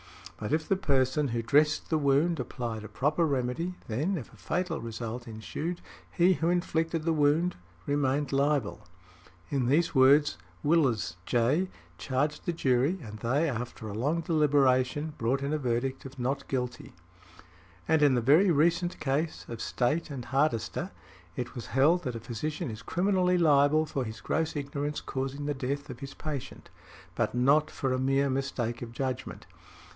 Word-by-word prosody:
But, 105 Hz, -, -4 dB
if 155 Hz, 0 st, 0 dB
the 195 Hz, -, +3 dB
person 140 Hz, -4 st, +1 dB
who 115 Hz, -2 st, -2 dB
dressed 150 Hz, +8 st, +2 dB
the 160 Hz, -, +3 dB
wound 145 Hz, +4 st, +2 dB
applied 115 Hz, -4 st, -4 dB
a -, -, -7 dB
proper 150 Hz, +10 st, +1 dB
remedy, 140 Hz, +6 st, -1 dB
then, 150 Hz, -, -1 dB
if 125 Hz, -7 st, -8 dB
a -, -, -16 dB
fatal 165 Hz, -, -2 dB
result 115 Hz, +1 st, -5 dB
ensued, 150 Hz, +10 st, -5 dB, 0.3 s
he 180 Hz, +2 st, +4 dB
who 165 Hz, -1 st, 0 dB
inflicted 165 Hz, -2 st, 0 dB
the 165 Hz, 0 st, +1 dB
wound 155 Hz, +4 st, +2 dB, 0.3 s
remained 145 Hz, 0 st, 0 dB
liable." 140 Hz, -9 st, 0 dB, 0.6 s
In 135 Hz, -4 st, +1 dB
these 155 Hz, +6 st, +2 dB
words 140 Hz, -, +5 dB, 0.2 s
Willes, 135 Hz, -, +2 dB
J., 135 Hz, +11 st, +2 dB, 0.3 s
charged 145 Hz, +3 st, -1 dB
the 175 Hz, -, +1 dB
jury, 135 Hz, +3 st, +2 dB
and 105 Hz, -2 st, -9 dB
they, 135 Hz, +8 st, +1 dB
after 120 Hz, -4 st, -4 dB
a 105 Hz, -, -5 dB
long 145 Hz, +10 st, 0 dB
deliberation, 145 Hz, -2 st, +2 dB
brought 130 Hz, +4 st, 0 dB
in 140 Hz, +2 st, -1 dB
a 155 Hz, -, 0 dB
verdict 130 Hz, +1 st, -2 dB
of 135 Hz, +1 st, -9 dB
"not 130 Hz, +3 st, -2 dB
guilty". 125 Hz, -2 st, -4 dB, 0.9 s
And 160 Hz, -1 st, +3 dB
in 145 Hz, -3 st, +5 dB
the 120 Hz, -, +2 dB
very 155 Hz, -, +5 dB
recent 170 Hz, +3 st, +2 dB
case 150 Hz, +4 st, -1 dB
of 115 Hz, -2 st, -6 dB
State 140 Hz, +7 st, 0 dB
v. 145 Hz, -, -7 dB
Hardister, 135 Hz, -3 st, 0 dB, 0.5 s
it 125 Hz, -, -4 dB
was 120 Hz, -, -7 dB
held 155 Hz, +7 st, +3 dB
that 125 Hz, -2 st, -2 dB
a -, -, -4 dB
physician 120 Hz, +4 st, -4 dB
is 110 Hz, 0 st, -8 dB
criminally 180 Hz, -, +1 dB
liable 155 Hz, -1 st, +4 dB
for 140 Hz, -3 st, -2 dB
his 110 Hz, -1 st, -7 dB
gross 160 Hz, 0 st, -1 dB
ignorance 145 Hz, +1 st, -3 dB
causing 135 Hz, +2 st, -4 dB
the 145 Hz, -, 0 dB
death 140 Hz, +1 st, -3 dB
of 125 Hz, -, -9 dB
his 135 Hz, -1 st, -8 dB
patient, 150 Hz, -5 st, -6 dB, 0.4 s
but -, -, -1 dB
not 140 Hz, +5 st, +4 dB
for 135 Hz, -2 st, -2 dB
a 130 Hz, -, 0 dB
mere 135 Hz, +1 st, +2 dB
mistake 125 Hz, -3 st, -2 dB
of 120 Hz, -1 st, -6 dB
judgment. 130 Hz, -1 st, -4 dB
140 Hz, 165 wpm, -29 LUFS, 125-155 Hz, 0.9 s, words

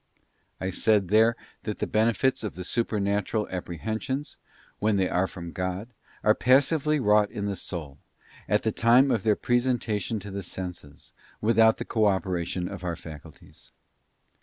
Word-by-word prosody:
I 95 Hz, 0 st, -2 dB
said 100 Hz, -1 st, +2 dB
there 110 Hz, +3 st, +5 dB, 0.3 s
that 105 Hz, -, -4 dB
the -, -, -1 dB
benefits 115 Hz, +4 st, +1 dB
of 105 Hz, -, -4 dB
the 90 Hz, -, -6 dB
Supernatural 105 Hz, 0 st, -1 dB
Apprehensions, 110 Hz, -, -4 dB, 0.4 s
when 105 Hz, -1 st, +2 dB
they 95 Hz, -1 st, +2 dB
are 90 Hz, +2 st, +1 dB
from 85 Hz, -3 st, -8 dB
God, 95 Hz, +5 st, -4 dB, 0.3 s
are 105 Hz, -, +5 dB
passively 145 Hz, +5 st, +3 dB
wrought 105 Hz, -3 st, +4 dB
in 105 Hz, -3 st, -4 dB
the 100 Hz, -1 st, -2 dB
soul, 75 Hz, -8 st, -7 dB, 0.5 s
at -, -, +2 dB
the -, -, +1 dB
time 125 Hz, +4 st, +4 dB
of 110 Hz, -, +1 dB
their 110 Hz, 0 st, +3 dB
presentation 120 Hz, -4 st, 0 dB
to 100 Hz, -, -8 dB
the 100 Hz, +1 st, -4 dB
senses, 90 Hz, -6 st, -8 dB, 0.3 s
without 110 Hz, 0 st, +4 dB
the -, -, -5 dB
cooperation 95 Hz, -4 st, 0 dB
of 95 Hz, -1 st, -8 dB
our 85 Hz, -2 st, -2 dB
faculties. 80 Hz, -4 st, -13 dB
105 Hz, 150 wpm, -26 LUFS, 90-115 Hz, 0.5 s, there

